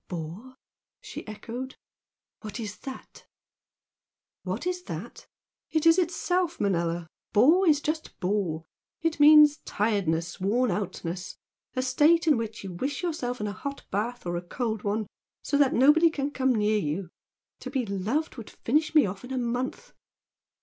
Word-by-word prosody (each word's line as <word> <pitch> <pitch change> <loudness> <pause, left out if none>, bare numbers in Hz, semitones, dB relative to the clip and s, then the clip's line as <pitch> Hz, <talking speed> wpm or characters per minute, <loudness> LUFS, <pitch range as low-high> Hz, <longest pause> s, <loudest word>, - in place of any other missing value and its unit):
"Bore?" 180 +10 -7 0.4
she - - -9
echoed 235 +5 -6 0.6
"What 215 +1 -7
is 210 -2 -5
that?" 265 -1 -10 1.1
"What - - -4
is 360 0 -1
that? - - -7 0.4
It 315 0 0
is 330 +2 +7
itself, 355 0 0
Manella! 170 -3 0 0.3
'Bore' 330 - +5
is 295 -1 +4
just 310 +1 -3
'bore.' 180 -4 -1 0.4
It 330 -2 0
means 300 0 +8
tiredness 185 - -1
worn 220 +5 +1
out 190 -1 -3
ness 175 +2 -5 0.4
a 255 - 0
state 300 +7 +4
in 310 -3 +5
which 225 -2 -4
you 190 -2 -6
wish 275 - -3
yourself 255 -8 -2
in 210 - -2
a 205 - -3
hot 280 +8 -6
bath 230 +4 -2
or 175 0 -2
a - - -3
cold 220 +4 -3
one, 210 +1 -1 0.4
so - - -1
that 280 -2 +4
nobody 300 +6 +6
can 290 -2 -3
come 260 -2 +1
near 215 0 +2
you. 165 +2 -3 0.5
To 255 - -7
be 260 -2 -1
'loved' 215 +11 -2
would 230 - -8
finish 310 +6 0
me 300 - +7
off 195 +2 -5
in 250 - -9
a 260 - -2
month!" 250 - -3
245 Hz, 160 wpm, -27 LUFS, 200-295 Hz, 1.1 s, means